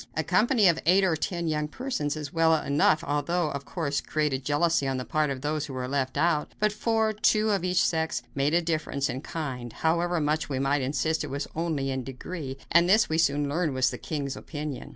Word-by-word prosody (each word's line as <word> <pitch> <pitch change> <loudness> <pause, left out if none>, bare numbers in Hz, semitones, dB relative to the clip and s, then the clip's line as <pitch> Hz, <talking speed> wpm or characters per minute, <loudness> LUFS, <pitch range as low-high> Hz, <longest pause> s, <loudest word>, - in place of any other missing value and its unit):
A - - +1
company 225 -3 +3
of 165 -2 +3
eight 190 +3 +5
or 180 -4 +2
ten 170 +2 -2
young 150 -1 0
persons 155 - -3
was 150 -2 -6
well 165 0 +4
enough, 150 +1 +2
although 150 +3 0
it, - - -5
of 140 0 -6
course, 145 -5 -2
created 150 -4 -1
jealousy 145 +1 +1
on 135 -1 -1
the 125 - -4
part 155 -1 0
of 135 -2 -4
those 150 +1 -2
who 135 - -8
were 125 -1 -3
left 130 -1 -1
out; 165 -3 +1
but 215 0 +2
four 220 0 +1
two 215 +1 +2
of 195 -4 0
each 180 0 +2
sex 160 -6 0
made 140 +3 +1
a 175 - +3
difference 155 -4 -1
in 130 - -5
kind, 130 -8 -5
however 170 +4 0
much 150 0 0
we 135 - -2
might 135 +2 +1
insist 145 +4 0
it - - -5
was 140 +2 -3
only 155 -5 -1
in 130 -1 -3
degree; 135 +2 -6
and 170 +2 +5
this 215 +3 +4
we 160 +1 +1
soon 145 -2 +2
learned 155 -1 -1
was 130 -1 +2
the - - -7
king's 140 -4 -4
opinion. 150 -3 -6
155 Hz, 225 wpm, -27 LUFS, 140-170 Hz, -, eight